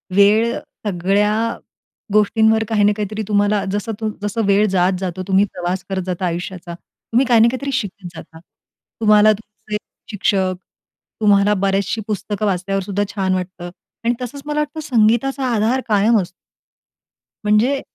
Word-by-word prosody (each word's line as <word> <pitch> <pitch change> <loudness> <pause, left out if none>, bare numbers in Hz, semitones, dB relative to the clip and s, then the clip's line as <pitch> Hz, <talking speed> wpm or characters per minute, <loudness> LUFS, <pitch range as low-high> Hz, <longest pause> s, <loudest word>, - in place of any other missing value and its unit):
वेळ 215 +4 +4 0.3
सगळ्या 195 +3 +1 0.8
गोष्टींवर 220 +1 +3
काही 215 -2 +1
ना 205 - +5
काहीतरी. 210 +1 -3
तुम्हाला 205 -1 +2
जसं 205 +2 -2 0.3
जसं 205 +2 -2
वेळ 200 +1 +4
जातो, 185 0 0
तुम्ही 195 +1 +4
प्रवास 180 +1 -3
करत 190 -1 -1
जाता 185 0 -3
आयुष्याचा, 175 0 -4
तुम्ही 235 +8 -2
काही 240 -2 +5
ना 230 - +6
काहीतरी 275 +2 -4
शिकत 200 -6 -3
जाता. 160 0 -11 0.6
तुम्हाला 215 0 +6
तुमचे 210 0 -7 0.3
शिक्षक, 190 -2 +1 0.7
तुम्हाला 205 -1 +4
बरेच 195 0 +1
असे 225 - -2
पुस्तकं 210 0 -3
वाचल्यावर 195 0 -1
सुद्धा 200 +1 -1
छान 190 -2 0
वाटतं. 180 -1 -4 0.4
आणि 240 - +3
तसंच 250 +3 -6
मला 300 0 -2
वाटतं, 300 +1 -3
संगीताचा 260 0 +1
आधार 230 +4 +1
कायम 215 +2 +3
असतो. 175 -1 -7 1.2
म्हणजे 230 +7 +2
205 Hz, 140 wpm, -19 LUFS, 190-220 Hz, 1.2 s, ना